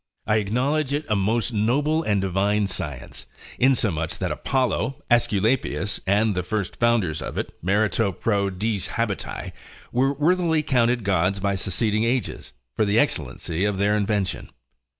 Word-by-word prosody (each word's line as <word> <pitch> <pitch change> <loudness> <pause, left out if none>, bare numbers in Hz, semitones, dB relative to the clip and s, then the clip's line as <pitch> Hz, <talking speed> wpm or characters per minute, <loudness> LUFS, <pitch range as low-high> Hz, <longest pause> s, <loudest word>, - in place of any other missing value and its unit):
I 105 - +2
acknowledge 130 +8 0
it 145 +1 -1
a 105 - +2
most 115 +5 0
noble 140 +9 +1
and 105 -9 +1
divine 100 +2 +1
science, 75 -9 -6 0.3
in 130 +1 +5
so 110 -5 0
much 80 +1 -3
that 95 -3 -2
Apollo, 130 - -1
Aesculapius, 105 - +1
and 105 +2 +3
the 90 - -1
first 100 +1 -3
founders 110 -10 +1
of - - -6
it, - - -3
merito 105 +2 +1
pro 100 0 0
diis 100 +1 -2
habiti, - - -3 0.4
were 135 +3 +2
worthily 160 +1 +2
counted 120 -4 +2
gods 95 0 +1
by 100 0 0
succeeding 105 +3 0
ages, 120 +1 -2 0.2
for - - +2
the 105 +1 +1
excellency 80 - 0
of 105 -1 0
their 100 +2 +2
invention. 100 -2 -1
105 Hz, 150 wpm, -24 LUFS, 95-125 Hz, 0.4 s, in